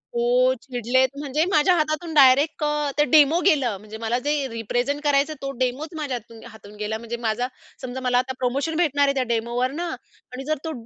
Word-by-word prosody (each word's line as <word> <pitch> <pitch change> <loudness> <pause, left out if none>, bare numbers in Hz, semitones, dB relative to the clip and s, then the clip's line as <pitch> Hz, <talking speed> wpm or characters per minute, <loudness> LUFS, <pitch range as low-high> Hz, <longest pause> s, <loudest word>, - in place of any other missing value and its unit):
हो. 250 +2 +3
चिडलेत 255 0 +1
म्हणजे 290 +1 0
माझ्या 360 +1 +4
हातातून 310 +1 -1
डायरेक्ट 285 +2 +5
अ, 295 -1 0
ते 295 - +5
डेमो 310 +1 +6
गेलं, 275 - +2
म्हणजे 215 +2 -10
मला 230 +2 -1
जे 290 -2 0
रिप्रेझेंट 245 +5 -2
करायचं 290 +1 +2
तो 275 - -3
डेमोच 260 +5 -1
माझ्या 290 -5 -3
हातून 230 0 -14
हातून 210 -1 -14
गेला, 210 +1 -3
म्हणजे 235 +1 -6
माझा 225 +3 0 0.3
समजा 255 0 -5
मला 250 -1 +1
आता 255 +1 0
प्रोमोशन 275 +6 -1
भेटणार 295 -4 +2
आहे 275 - +2
त्या 265 - +1
डेमोवर 235 +3 -1
ना 340 +5 -4 0.5
आणि 260 +1 -6
जर 310 0 0
तो 320 - -2
260 Hz, 195 wpm, -23 LUFS, 240-295 Hz, 0.5 s, डेमो